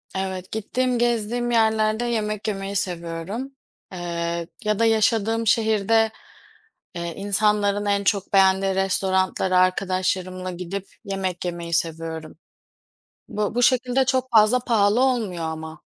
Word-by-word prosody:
evet, 190 -1 -4
gittiğim, 245 +3 -1
gezdiğim 240 0 0
yerlerde 220 0 +2
yemek 215 -3 -2
yemeyi 195 -1 -3
seviyorum. 180 +7 -4 0.4
Eee, 170 -1 -3 0.2
ya 210 -1 0
da 230 - +4
yaşadığım 225 0 +2
şehirde, 220 0 +3 0.8
eee, 170 -1 -4
insanların 205 0 +1
en 200 0 +1
çok 200 0 0
beğendiği 190 0 +4
restoranlara 190 -1 +1
arkadaşlarımla 185 0 0
gidip 180 +2 -5 0.2
yemek 190 -3 -3
yemeyi 170 -1 -4
seviyorum. 160 -1 -3 0.9
Bu 210 0 -2
bu 245 - +1
şekilde 255 +1 +3
çok 260 -1 0
fazla 225 +1 +5
pahalı 225 -2 +2
olmuyor 225 -10 0
ama. 160 -1 -6
200 Hz, 115 wpm, -23 LUFS, 185-225 Hz, 0.9 s, fazla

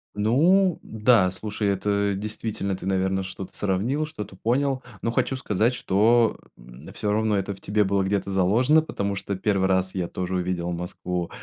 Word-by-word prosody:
Ну 165 - +3
да, 110 -3 +3
слушай, 105 +2 -3
это 100 +1 +1
действительно 105 -1 -3
ты, 90 - -9
наверно, 95 0 0
что-то 95 0 -8
сравнил, 110 +10 0
что-то 105 -10 -8
понял. 130 +6 0 0.2
Но 115 - -1
хочу 135 - 0
сказать, 115 -1 0
что, 115 +3 +3 0.2
м, - - -13
всё 105 -2 -2
равно 110 -1 +1
это 100 +1 -2
в 95 - -15
тебе 105 +1 +1
было 100 0 +1
где-то 100 0 -1
заложено, 115 - +3
потому 100 -9 -3
что 100 +1 -4
первый 95 0 +1
раз 95 0 +1
я 90 -3 -2
тоже 95 0 -3
увидел 90 -1 -2
Москву, 90 0 -4
100 Hz, 170 wpm, -25 LUFS, 95-110 Hz, 0.2 s, Ну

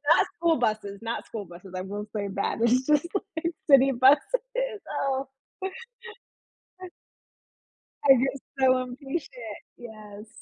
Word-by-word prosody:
Not - - +4
school 335 -1 +3
buses, 215 -4 -1
not 230 0 -4
school 210 -3 -6
buses, 175 +2 -13
I - - -2
will 205 +2 -5
say 205 -2 -2
that. 200 - -1
It's 245 +3 +3
just, 300 +2 +3 0.3
like, 335 +1 -1 0.2
city 275 -1 +7
buses, 450 - +2 0.3
oh. 270 0 -1 2.8
I - - +12
get 270 +2 0 0.2
so 255 -1 +4
impatient, 255 -3 -6 0.2
yes. 215 -2 -11
255 Hz, 120 wpm, -27 LUFS, 215-280 Hz, 2.8 s, I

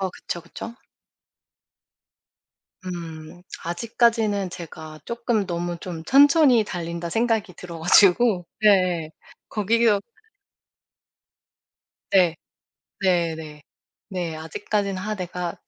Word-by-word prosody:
어 190 -1 -1
그쵸, 175 - -6
그쵸. 200 +7 -9 2.1
음. 170 -1 -8 0.2
아직까지는 215 +1 +1
제가 160 -3 -9
쪼끔 235 -3 -1
너무 175 -1 -3
좀 170 -3 -6
천천히 280 - +6
달린다 170 -2 -5
생각이 225 -3 0
들어 170 -2 -8
가지고 185 +3 +5 0.2
예예. 180 -6 +3 0.4
거기어 215 0 +2 2.1
네. 180 -4 +4 0.7
네네. 160 -5 -1 0.5
네 175 -4 -3
아직까지는 195 +5 -2
'아 215 +1 -2
내가 180 -2 -4
180 Hz, 190 characters per minute, -24 LUFS, 170-215 Hz, 2.1 s, 천천히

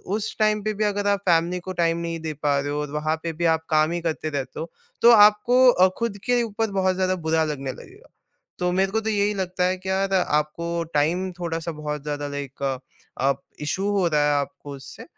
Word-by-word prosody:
उस 220 0 -3
टाइम 215 -1 +2
पे 215 +1 -1
भी 215 +1 -2
अगर 205 -1 0
आप 200 -1 +2
फैमिली 175 0 +2
को 185 +1 -6
टाइम 165 -1 +2
नहीं 170 -1 -4
दे 160 -1 -4
पा 145 -1 +2
रहे 140 +1 -3
हो 145 - -2
और 150 -1 -5
वहाँ 155 +1 -1
पे 165 -1 -3
भी 170 +2 -2
आप 160 0 -9
काम 155 0 +3
ही 175 - -1
करते 160 -1 -2
रहते 140 -3 -4
हो, 165 +2 -6 0.3
तो 235 - +8
आपको 210 +2 +6
अ, 185 -4 +5
खुद 230 -3 -2
के 245 -1 +2
ऊपर 220 -1 -2
बहुत 190 -1 +1
ज़्यादा 185 0 +1
बुरा 160 0 +3
लगने 135 -2 -5
लगेगा। 405 - -15 0.5
तो 180 -1 0
मेरे 190 +1 +1
को 220 - +1
तो 220 0 -2
यही 205 -1 +1
लगता 185 -2 -1
है 185 +1 +1
कि 190 +1 -9
यार, 195 +1 0
आपको 170 0 0
टाइम 170 +6 +1
थोड़ा-सा 165 -1 -3
बहुत 150 -1 -5
ज़्यादा 145 0 -4
लाइक 140 -1 -7
अ, 135 -1 -1 0.5
अप 140 0 -1 0.2
इश्यू 185 +7 -1
हो 200 -3 +2
रहा 150 -2 +2
है 150 - +3
आपको 140 +1 -7
उससे, 135 0 -11
170 Hz, 230 wpm, -24 LUFS, 150-200 Hz, 0.5 s, तो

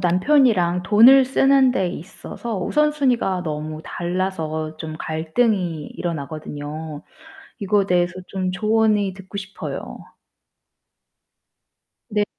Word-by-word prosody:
남편이랑 180 - +3
돈을 245 +7 +7
쓰는 270 0 +4
데 190 -7 0
있어서 195 +5 -7
우선순위가 260 -6 +1
너무 155 -1 -5
달라서 165 -4 -3
좀 160 0 -6
갈등이 165 +1 -1
일어나거든요. 155 -1 -6 0.6
이거에 200 0 +1
대해서 180 -1 +1
좀 185 -1 -3
조언이 215 +1 +1
듣고 190 +1 -10
싶어요. 195 0 -6 2.1
네. 210 -2 +1
185 Hz, 235 characters per minute, -21 LUFS, 160-220 Hz, 2.1 s, 돈을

